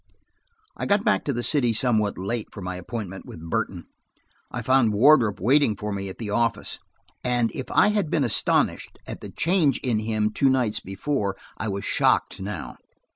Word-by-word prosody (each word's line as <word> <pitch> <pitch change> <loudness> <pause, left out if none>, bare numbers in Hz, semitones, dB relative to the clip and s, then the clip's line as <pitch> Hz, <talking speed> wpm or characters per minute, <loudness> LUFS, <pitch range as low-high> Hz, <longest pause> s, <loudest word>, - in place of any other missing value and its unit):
I - - -4
got 205 0 +3
back 215 - +2
to 145 - 0
the 120 -2 -3
city 125 -6 +2
somewhat 110 -3 +1
late 105 +4 -3
for - - -9
my 90 0 -4
appointment 95 +1 -6
with 80 +1 -9
Burton. - - -2 0.6
I 120 - -5
found 130 -3 +3
Wardrop 115 -2 +5
waiting 125 +2 +4
for 105 +2 -4
me 100 -1 -4
at 95 - -9
the 110 -3 -5
office, 115 +1 -1 0.4
and 120 -2 +1
if 130 - -6
I 210 - +4
had 205 -6 0
been 150 - +1
astonished 120 - 0
at - - -7
the - - -7
change 165 -6 +2
in 120 -5 +1
him 110 -1 0
two 135 +5 +2
nights 125 -5 +1
before, 100 0 -2 0.2
I 110 - -4
was 100 -1 -3
shocked - - +2
now. 95 -3 -6
115 Hz, 180 wpm, -24 LUFS, 100-130 Hz, 0.6 s, Wardrop